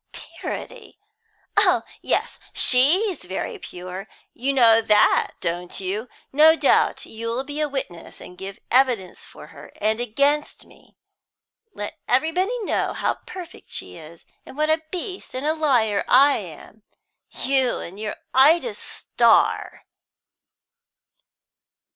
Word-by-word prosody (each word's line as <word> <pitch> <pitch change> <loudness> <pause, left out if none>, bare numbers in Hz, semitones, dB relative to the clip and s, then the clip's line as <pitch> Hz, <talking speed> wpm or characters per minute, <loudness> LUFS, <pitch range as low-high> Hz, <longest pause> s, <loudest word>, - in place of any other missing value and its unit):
"Purity! 460 -4 -8 0.6
Oh - - +4 0.2
yes, - - -1
she's 320 - +3
very 185 +1 -5
pure 185 +3 -8 0.3
you 265 +4 -1
know 230 -4 +5
that, 215 -1 +3
don't 175 +2 -3
you? 200 +5 -4 0.2
No 310 +3 +7
doubt - - +2
you'll 230 +3 -4
be 290 +2 -6
a 300 - 0
witness, 220 -12 -6
and 180 - -11
give 195 +2 -8
evidence 245 -7 +1
for - - -13
her, - - -13
and 220 +2 0
against 280 +6 0
me; - - -22 0.8
let 205 - -6
everybody 355 - +1
know - - -1
how - - -2
perfect 360 -2 -10
she - - -5
is, 165 0 -13 0.2
and - - -13
what 305 +1 +2
a 315 0 +1
beast 370 -3 -6
and 260 +3 -3
a 310 - +2
liar 245 -10 +1
I 275 +3 +5
am! 195 +3 -11 0.5
You 265 -2 0
and 190 +4 -9
your 215 -1 -4 0.2
Ida 320 - +4
Starr!" - - +1
255 Hz, 125 wpm, -23 LUFS, 205-305 Hz, 0.8 s, No